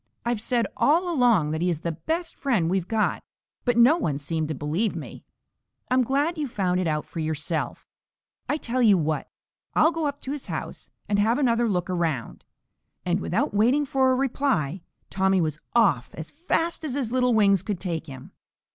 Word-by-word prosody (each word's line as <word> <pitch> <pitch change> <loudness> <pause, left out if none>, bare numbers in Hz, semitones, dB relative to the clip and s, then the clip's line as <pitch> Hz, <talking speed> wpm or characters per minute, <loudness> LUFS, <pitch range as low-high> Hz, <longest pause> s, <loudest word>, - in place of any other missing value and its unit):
I've 235 -3 -1
said 235 0 0
all 345 +4 +2
along 235 - +3
that 160 +1 -2
he 180 - +2
is 165 -3 -2
the 170 - -2
best 325 - -3
friend 210 - 0
we've 185 -2 0
got, 220 -2 0 0.4
but 245 -2 +2
no 250 +8 +6
one 150 - -1
seemed 155 +2 -2
to 155 - -3
believe 160 - -1
me. - - -8 0.7
I'm 255 0 +4
glad 290 +7 0
you've 290 -3 -2
found 185 -5 0
it 185 - 0
out 150 -1 -1
for 170 - -8
yourself. 155 +1 -3 0.6
I 295 - +1
tell 255 -3 -2
you 210 -5 +6
what, 155 -2 -2 0.5
I'll 315 - +5
go 325 -2 -1
up 285 0 -4
to 265 - -5
his 290 -2 -5
house - - -6 0.2
and 205 0 +1
have 225 +4 +3
another 235 -4 +2
look 180 -3 -1
around." 165 -9 -2 0.6
And 180 +1 +1
without 195 +3 -1
waiting 245 +8 +3
for 265 -1 +2
a - - +3
reply, 245 - 0 0.3
Tommy 190 0 +2
was 155 -3 -1 0.2
off 175 - +3
as 160 0 -8
fast 335 +1 -1
as 280 -4 -3
his 255 -6 -2
little 250 -2 +2
wings 200 -4 +4
could 195 -2 -3
take 170 -3 -4
him. 135 -3 -10
210 Hz, 190 wpm, -25 LUFS, 165-260 Hz, 0.7 s, no